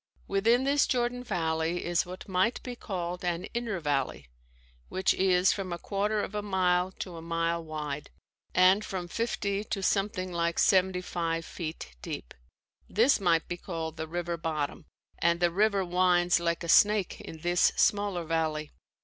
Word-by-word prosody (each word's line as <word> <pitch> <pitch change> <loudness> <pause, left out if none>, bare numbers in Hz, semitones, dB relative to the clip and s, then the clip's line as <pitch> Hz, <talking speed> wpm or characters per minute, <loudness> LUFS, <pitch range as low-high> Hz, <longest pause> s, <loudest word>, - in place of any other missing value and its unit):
Within 225 +6 +3
this 280 +1 +3
Jordan 245 0 0
valley 165 -4 -1
is 175 0 +1
what 185 +1 -9
might 190 +5 +1
be 250 -1 -5
called 180 -5 -4
an 175 0 -1
inner 230 -5 -2
valley 135 - -1 0.6
which 190 -1 +2
is 185 -1 +3
from 195 -3 -5
a 175 - -2
quarter 205 +3 -1
of - - -5
a 210 - -1
mile 185 -2 +1
to 180 -3 -7
a - - -7
mile 165 0 -1
wide, 150 -2 -5 0.5
and 185 +3 +5
from 185 -4 -4
fifty 205 -1 -2
to 195 -2 -3
something 190 -2 0
like 170 -1 0
seventy 185 -1 +3
five 165 -2 -2
feet 155 - -7
deep. - - -6 0.6
This 235 +6 +4
might 170 -4 +2
be 175 - -4
called 165 -3 -5
the 160 0 -4
river 175 +1 -3
bottom 155 -3 -3 0.3
and 170 0 +2
the 175 -1 +3
river 200 +1 +2
winds 180 -1 +3
like 170 0 -1
a - - -5
snake 205 +2 +4
in 160 - -9
this 175 +1 +3
smaller 200 -4 +2
valley. 155 -2 -1
180 Hz, 165 wpm, -29 LUFS, 165-195 Hz, 0.6 s, and